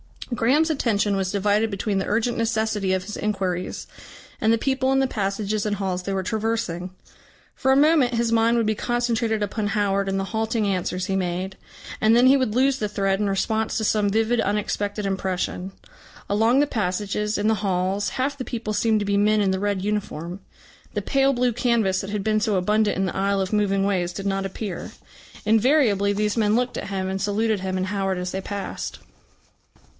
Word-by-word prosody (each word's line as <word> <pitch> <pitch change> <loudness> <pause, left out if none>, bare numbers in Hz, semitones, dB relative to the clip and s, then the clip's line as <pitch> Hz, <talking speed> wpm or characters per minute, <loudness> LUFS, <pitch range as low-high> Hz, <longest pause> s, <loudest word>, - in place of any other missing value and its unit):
Graham's 280 +8 +2
attention 210 -8 +1
was 190 -1 -1
divided 205 +2 +1
between 200 0 -1
the 190 - -3
urgent 230 +3 0
necessity 220 -4 0
of 185 -1 0
his 210 +3 -6
inquiries 190 -4 -2 0.5
and 220 - +3
the 230 - +4
people 265 +2 0
in 270 - +3
the 270 - +3
passages 205 -2 -2
and 210 -1 0
halls 185 -2 -2
they 195 - -3
were 190 -1 -1
traversing. 215 -4 -2 0.6
For 265 - +1
a - - +5
moment 285 -4 +4
his 230 0 +1
mind 230 +1 +3
would 230 - +2
be 215 - +2
concentrated 230 -1 0
upon 205 +1 -2
Howard 200 -1 0
and 195 0 0
the - - -1
halting 220 0 0
answers 185 -1 -1
he 195 -1 -1
made, 185 +1 -2 0.4
and 220 +1 +4
then 245 +2 +5
he 270 +2 +6
would 255 -5 -1
lose 270 +1 +3
the 210 - -1
thread 195 -1 0
in 205 -1 0
response 220 +3 0
to 220 - -1
some 210 -1 +2
vivid 225 +3 +1
unexpected 205 0 -1
impression. 190 -1 -2 0.6
Along 225 +6 +3
the 290 - +4
passages, 210 -2 -1
in 205 +1 0
the 220 - +3
halls, 195 0 0
half 275 +2 -1
the 255 - -5
people 225 -3 -4
seemed 215 +1 +2
to - - -1
be 200 0 +1
men 210 +1 +3
in 195 -2 +2
the 190 - -1
red 200 -1 -1
uniform. 195 -4 -3 0.6
The - - -1
pale 275 0 +2
blue 250 -1 +1
canvas 220 -6 +1
that 195 - -6
had 205 -1 -2
been 215 0 +2
so 215 -1 0
abundant 210 +3 +1
in 190 - +1
the 185 - -3
aisle 195 0 +1
of 190 +2 -3
moving 195 -2 +2
ways 180 -3 0
did 195 - -6
not 195 0 -1
appear. 195 -1 -6 0.5
Invariably 220 -3 +3
these 210 +2 -1
men 215 -1 +3
looked 250 +1 0
at - - -4
him, 190 -1 -2
and 190 0 -3
saluted 210 +1 0
him 185 0 -3
and 185 0 -1
Howard 195 -1 -1
as 180 0 -3
they 190 - -3
passed. 200 -1 -5
210 Hz, 200 wpm, -23 LUFS, 195-225 Hz, 0.6 s, he